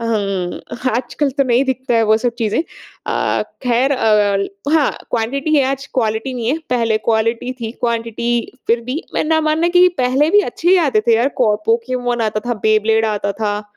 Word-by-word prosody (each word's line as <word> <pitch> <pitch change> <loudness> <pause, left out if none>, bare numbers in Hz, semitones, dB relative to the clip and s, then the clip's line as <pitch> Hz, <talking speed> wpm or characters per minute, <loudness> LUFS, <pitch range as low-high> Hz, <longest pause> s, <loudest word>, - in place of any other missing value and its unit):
अ, - - -4
हुँ। 195 -5 -2 0.4
आजकल 265 +3 -1
तो 275 +1 +1
नहीं 250 +1 +2
दिखता 260 -1 -1
है 230 - +4
वो 215 0 +4
सब 240 0 -1
चीज़ें। 220 +1 0 0.5
अ, - - 0 0.2
खैर 250 +3 +2
अ, 205 -1 +1
हाँ 300 -4 +3 0.2
क्वांटिटी 275 +7 -1
है 280 - +4
आज 275 0 -4
क्वालिटी 225 +1 -1
नहीं 235 -2 -3
है। 300 - 0
पहले 230 -3 +1
क्वालिटी 230 +2 0
थी 225 -1 -4
क्वांटिटी 235 0 -2 0.2
फिर 235 +1 +3
भी 265 +8 -3
मैं - - 0
ना 315 0 +2
मानना 315 +2 +1
कि 365 0 +7
पहले 260 +5 +2
भी 415 +3 +6
अच्छे 350 -4 -2
ही 380 - +6
आते 215 -5 +2
थे 230 - +6
यार। 240 +4 +2
कौ 215 -4 +4
Pokemon 240 +1 0
आता 215 -1 -1
था, 240 -4 -2
Beyblade 220 +1 +2
आता 200 -1 -2
था। 210 0 -2
235 Hz, 190 wpm, -17 LUFS, 220-265 Hz, 0.5 s, कि